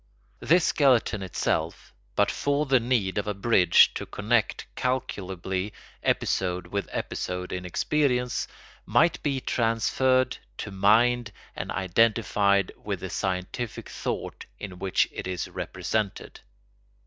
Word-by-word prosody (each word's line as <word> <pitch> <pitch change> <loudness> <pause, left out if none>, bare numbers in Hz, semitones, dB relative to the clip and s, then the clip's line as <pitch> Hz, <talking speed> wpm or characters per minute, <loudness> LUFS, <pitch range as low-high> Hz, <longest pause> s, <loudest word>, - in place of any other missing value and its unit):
This 170 +2 +3
skeleton 125 -7 +3
itself, 95 -2 -2 0.2
but - - +3
for 145 +1 0
the 135 -2 +4
need 115 -5 0
of 105 - -4
a 105 - -1
bridge 95 -4 +5
to - - -5
connect - - 0
calculably 95 -6 -2 0.3
episode 90 -1 0
with 100 -1 -3
episode 90 0 -4
in 90 0 -4
experience, 125 - 0 0.4
might 170 -1 +2
be 140 -3 0
transferred 130 +2 +1 0.2
to 105 - -5
mind 110 +4 +3 0.2
and - - -5
identified 100 +1 +2
with - - -3
the - - -5
scientific 95 +5 -3
thought - - -5
in 90 -3 -8
which 95 0 +2
it - - -6
is 90 -2 -3
represented. 105 -3 -3
105 Hz, 120 wpm, -26 LUFS, 95-125 Hz, 0.4 s, bridge